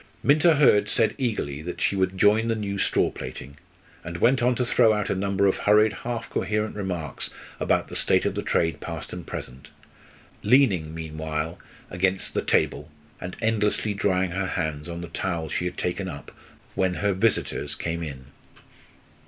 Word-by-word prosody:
Minta 155 +3 +5
Hurd 105 -8 +5
said 110 0 +2
eagerly 105 - -2
that 90 +3 -6
she - - +1
would 95 0 0
join 105 +4 +4
the 115 - +1
new 100 -2 -3
straw 95 - +2
plaiting, 70 +2 -8 0.5
and 85 0 -5
went 125 +8 +3
on 125 +1 +3
to 125 - 0
throw 115 -2 +4
out 105 -1 -1
a - - +1
number 100 +1 +1
of 95 - +3
hurried, 105 +1 +4
half 120 +3 -4
coherent 105 0 -1
remarks 90 -7 -4 0.3
about - - +1
the - - -8
state - - +2
of - - +1
the - - -2
trade 80 -1 0
past 80 -2 -6
and 90 -1 -7
present, 65 +4 -7 0.7
leaning 95 - +3
meanwhile 80 0 -4 0.3
against 95 +1 0
the - - 0
table 75 +3 +1 0.3
and 90 0 -6
endlessly 105 -1 +1
drying 95 -2 +1
her 95 +1 -1
hands 80 -2 -3
on 85 0 -5
the 85 - -6
towel 85 -1 -3
she 90 - -2
had 90 - -4
taken 90 +2 -2
up 70 -6 -8 0.4
when 95 -1 +1
her 100 +1 +1
visitors 110 +4 0
came 85 0 -3
in. 70 -5 -6
95 Hz, 175 wpm, -25 LUFS, 85-105 Hz, 0.7 s, Minta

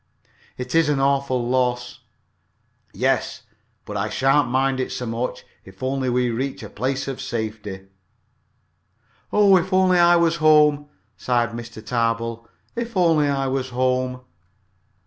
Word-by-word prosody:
"It 125 0 -6
is 165 -2 +3
an 145 -2 +1
awful 135 -3 +1
loss." 125 -1 -1 0.9
"Yes - - -1 0.4
but - - -7
I - - -1
sha'n't 135 0 +2
mind 130 +1 +1
it 130 - -2
so 125 - -4
much, 115 +2 -4 0.2
if 95 +3 -13
only 130 0 -1
we 125 0 +1
reach 130 +2 -4
a 105 - -9
place 130 +5 -2
of 135 -2 -5
safety." 105 -4 -5 1.5
"Oh, 205 -2 +5
if 185 +2 -2
only 185 -1 +4
I 175 0 +6
was 170 -1 +2
home!" 150 -2 +4 0.3
sighed 120 +3 0
Mr. 115 -1 -9
Tarbill. 115 -1 -2 0.3
"If 235 -3 -4
only 165 -5 +3
I 135 -1 0
was 130 -1 -2
home!" 125 0 -1
130 Hz, 140 wpm, -22 LUFS, 120-145 Hz, 1.5 s, I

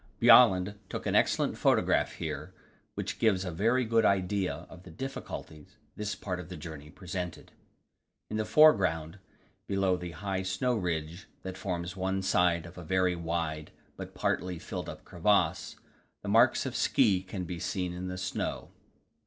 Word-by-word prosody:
Bjaaland 100 -4 +6
took - - -5
an - - 0
excellent - - +2
photograph - - +2
here, - - -5 0.4
which - - -4
gives 100 -5 +2
a 90 - -3
very 115 +9 +2
good 115 0 +3
idea 95 -4 0
of 90 - -13
the 90 - -13
difficulties 95 - -8 0.2
this 105 0 -3
part 90 -2 -4
of 90 -1 -8
the 90 - -7
journey 75 -2 -9
presented. 90 +1 -6 0.8
In 110 - -3
the 110 - +1
foreground, 95 - +4 0.5
below 95 -2 +1
the 90 -1 -7
high 95 0 -2
snow 95 +7 0
ridge 85 -1 -3 0.2
that 95 -1 -5
forms 90 -2 -4
one 95 0 -1
side 90 -3 +2
of 85 +1 -11
a - - -8
very 90 +1 +1
wide 80 -2 -3 0.3
but - - -9
partly 90 -1 -1
filled - - -6
up - - -10
crevasse, 100 +4 +1 0.5
the - - -6
marks - - +4
of - - -4
ski 95 -4 +3
can 95 0 -6
be 85 0 -5
seen 90 0 -2
in 90 +1 -5
the 90 0 -5
snow. 90 0 -3
90 Hz, 160 wpm, -30 LUFS, 85-100 Hz, 0.8 s, Bjaaland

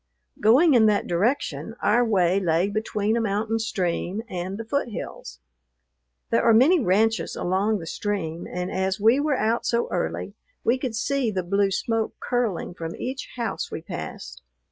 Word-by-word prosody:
Going 270 +9 +5
in 225 -3 +6
that 210 -1 +2
direction, 185 - -1
our 240 +3 +3
way 190 -5 +2
lay 175 +1 +1
between 215 0 -1
a 235 - +1
mountain 220 +1 -1
stream 190 -1 -2
and 185 -1 -4
the 225 - -6
foothills. 220 - -4 0.9
There - - +3
are 230 -1 +5
many 305 +10 +6
ranches 220 0 +1
along 195 +4 0
the 170 - -7
stream, 170 -3 -3
and 180 +1 -3
as 190 +1 -1
we 225 +6 +4
were 290 -2 +1
out 225 +2 +1
so 235 0 0
early, - - -2 0.3
we 245 +3 +2
could 255 -4 -3
see 265 +1 0
the 190 -3 -2
blue 200 +3 +2
smoke 225 +3 -1
curling 235 -9 -1
from 165 -1 -6
each 260 +2 -5
house 235 -2 -3
we - - -6
passed. - - -7
215 Hz, 165 wpm, -24 LUFS, 185-235 Hz, 0.9 s, in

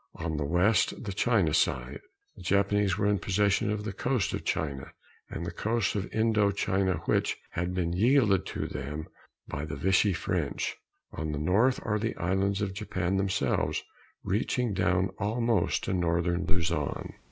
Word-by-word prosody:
On 80 -1 -3
the 75 -1 -1
west, 90 +10 +2
the 100 -4 -4
China 100 -8 +2
side, 65 -2 +1 0.4
the - - -12
Japanese 100 +1 +2
were 105 - 0
in 100 -1 +2
possession 100 +1 +1
of 105 -1 -1
the 105 -2 -4
coast 120 0 0
of - - -3
China 70 -4 -2 0.4
and 85 - -5
the 85 - -3
coast 110 -2 0
of 100 -2 -3
Indo 110 -2 +3
China 95 -2 0
which - - +1
had 90 +1 -2
been 85 -2 0
yielded 105 -1 +3
to - - -3
them 75 +3 -5 0.4
by 70 - -4
the 75 -2 -4
Vichy 95 +6 +3
French. 85 - -2 0.4
On 80 0 -4
the 75 - -3
North 105 - +3
are 105 -1 +1
the 115 +2 -2
islands 95 +3 0
of 95 -2 -2
Japan 95 -2 -2
themselves, 95 -1 0 0.4
reaching 115 +3 0
down 90 +1 +2
almost 115 -1 +1
to - - -1
northern 85 0 +1
Luzon. 85 -4 -1
95 Hz, 165 wpm, -29 LUFS, 85-105 Hz, 0.4 s, Indo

